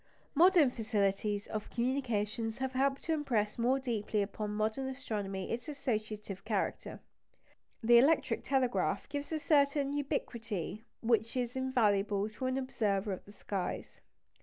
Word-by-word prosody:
Modern 335 -4 +6
facilities 205 -2 0
of 215 -1 -5
communication 235 -3 -1
have 260 +3 -3
helped 270 +1 +1
to 325 - 0
impress 235 -9 0
more 250 +3 +3
deeply 220 -5 -1
upon 210 +1 -4
modern 220 +5 0
astronomy 210 -8 -4
its 235 +4 -3
associative 215 -8 -3
character. 215 -2 -2 0.8
The 235 +1 +8
electric 295 +6 +3
telegraph 265 -2 +1
gives 285 +1 -4
a 320 - 0
certain 285 -2 +3
ubiquity 230 - -3 0.2
which 230 +1 +2
is 245 0 -1
invaluable 210 -6 +2
to 235 +4 -4
an 260 +1 0
observer 210 -6 0
of 185 - -8
the 205 - -13
skies. 195 -3 -4
235 Hz, 135 wpm, -33 LUFS, 210-270 Hz, 0.8 s, The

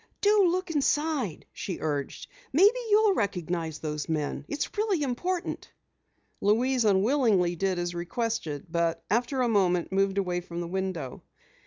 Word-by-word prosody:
"Do 410 -2 +4
look 365 0 -1
inside," 295 - 0
she 185 - -4
urged. 145 -3 -3 0.3
"Maybe 390 - +6 0.2
you'll 425 -1 +5
recognize 175 - -2
those 150 0 -4
men. 150 -2 -2
It's 295 - -3
really 410 -7 +1
important." 345 +8 -3 0.7
Louise 240 +4 +2
unwillingly 200 -3 +3
did 190 +1 0
as 175 0 -2
requested, 175 - -3
but 170 0 -1
after 245 +4 +1
a - - +2
moment 185 -6 +2
moved 195 0 +1
away 180 -2 0
from 170 -1 -7
the 175 - -3
window. 180 -7 -4
195 Hz, 140 wpm, -28 LUFS, 170-280 Hz, 0.7 s, Maybe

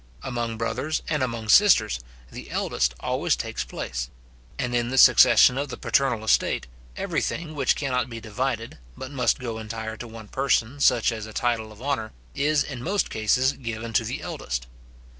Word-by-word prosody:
Among 120 -3 -3
brothers 125 +7 -2
and 150 -3 0
among 115 -3 -3
sisters, 110 - +5 0.3
the - - -9
eldest 60 +1 0
always - - 0
takes - - -4
place; - - -5 0.5
and 120 - -2
in 120 -1 +1
the 130 - -2
succession 130 0 +7
of 145 0 -3
the - - -6
paternal 125 -5 +1
estate, - - +2 0.3
every - - -1
thing 160 -1 -3
which 140 -4 +2
cannot 130 -3 -1
be 115 -1 -6
divided, 115 - -3 0.2
but 130 - -7
must 135 -3 +1
go 115 -3 -5
entire 110 0 -5
to 120 - -7
one 110 -1 -10
person, 135 -1 0
such 125 -4 +4
as 110 -1 -5
a 110 - -10
title 115 -2 -1
of 110 +3 -13
honour, 125 -6 -2 0.2
is 145 0 +2
in 130 -5 -7
most 195 +7 -1
cases 125 +5 +2
given 115 -2 -6
to - - +3
the - - -5
eldest. - - -4
120 Hz, 180 wpm, -25 LUFS, 110-135 Hz, 0.5 s, succession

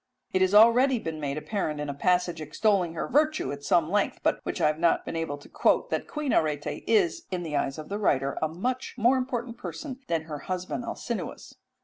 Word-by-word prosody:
It 185 - +2
has 190 +2 +3
already 240 +4 +6
been 160 -7 -5
made 145 -1 -3
apparent 155 -3 -2
in 150 - -3
a 140 - -3
passage 180 +3 +1
extolling 175 +2 +1
her 160 - -2
virtue 305 +3 +2
at 140 0 -7
some 165 +1 +2
length, 205 0 +1
but - - +2
which - - -4
I - - +3
have 155 +1 +1
not 170 0 +2
been - - -5
able 165 -3 -2
to 145 - -15
quote, - - +1
that - - -1
Queen 300 -4 -2
Arete 150 -2 0
is, 350 -5 +2
in 180 -2 -3
the 155 -3 -4
eyes 135 -1 -1
of 155 - -7
the 205 +1 -3
writer, 140 -8 +1
a 155 - +2
much 245 +11 -3
more 245 +4 +4
important 245 -2 -3
person 270 -4 -6
than 165 -2 0
her 155 -2 -6
husband 185 - -4
Alcinous. 225 -9 -5
180 Hz, 220 wpm, -27 LUFS, 155-235 Hz, -, already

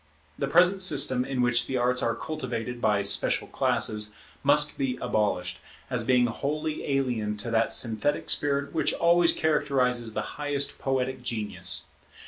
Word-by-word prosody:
The 140 - -3
present 180 +6 +4
system, 140 -7 +3
in 130 -1 -2
which 120 0 +2
the 130 - -2
arts 125 +1 +1
are 115 -2 0
cultivated 125 -4 -5
by 105 -2 +2
special 100 - +2
classes, 105 -1 +1 0.3
must 150 +1 +3
be 130 -2 -2
abolished, 90 -4 -1 0.3
as - - -2
being 125 -1 +3
wholly 150 +6 -3
alien 110 -6 -2
to 115 +3 -4
that 115 0 +1
synthetic 115 +6 +1
spirit 140 -1 0
which 160 - 0
always 170 0 +4
characterizes 130 -7 0
the - - -5
highest 145 -1 -1
poetic 130 -2 -2
genius. 90 -9 -1
125 Hz, 145 wpm, -26 LUFS, 115-145 Hz, 0.3 s, present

